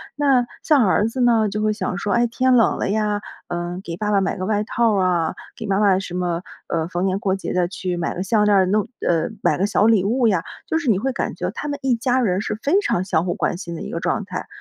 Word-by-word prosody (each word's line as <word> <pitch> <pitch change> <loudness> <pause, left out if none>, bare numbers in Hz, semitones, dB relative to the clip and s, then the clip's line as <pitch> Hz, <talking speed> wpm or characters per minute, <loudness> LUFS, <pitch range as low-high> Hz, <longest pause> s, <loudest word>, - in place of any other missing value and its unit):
那 275 -4 +3 0.2
像 285 -7 +4
儿 205 +3 +2
子 250 +3 -3
呢， 225 -3 +3
就 210 +2 -3
会 215 0 +1
想 210 -4 -3
说， 205 - -1
哎， 235 0 +3
天 255 +2 +2
冷 230 - +3
了 - - -1
呀， 210 0 0 0.3
嗯， 175 +1 -4
给 165 0 -6
爸 210 +1 -1
爸 200 -1 +3
买 195 - -1
个 185 - -3
外 210 0 0
套 230 0 +1
啊， 180 -4 +1 0.2
给 - - -7
妈 195 0 +1
妈 195 -3 +4
什 185 - -7
么， 175 -2 -1 0.3
呃， 165 -1 -1
逢 180 +1 -2
年 190 0 0
过 190 -2 0
节 195 - -5
地 180 -1 +1
去 180 -1 -4
买 170 - -2
个 180 - -2
项 210 +2 +2
链 205 -1 +4
儿， 190 -1 +5
弄 205 +2 +1 0.2
呃， 165 -2 +1
买 - - +2
个 195 - +1
小 205 - +2
礼 220 -4 +4
物 235 +3 +2
呀， 185 -6 +1 0.2
就 320 - 0
是 290 -6 -2
你 205 - +4
会 265 +4 -1
感 - - -3
觉 - - -3
他 295 - -6
们 285 -1 -3
一 260 -2 +2
家 245 +2 +1
人 190 -4 +1
是 215 - -3
非 290 - +2
常 180 - 0
相 175 -3 0
互 175 - 0
关 - - -1
心 170 -2 -6
的 - - -7
一 - - -6
个 - - -3
状 - - -1
态。 - - -6
205 Hz, 290 characters per minute, -21 LUFS, 180-230 Hz, 0.3 s, 儿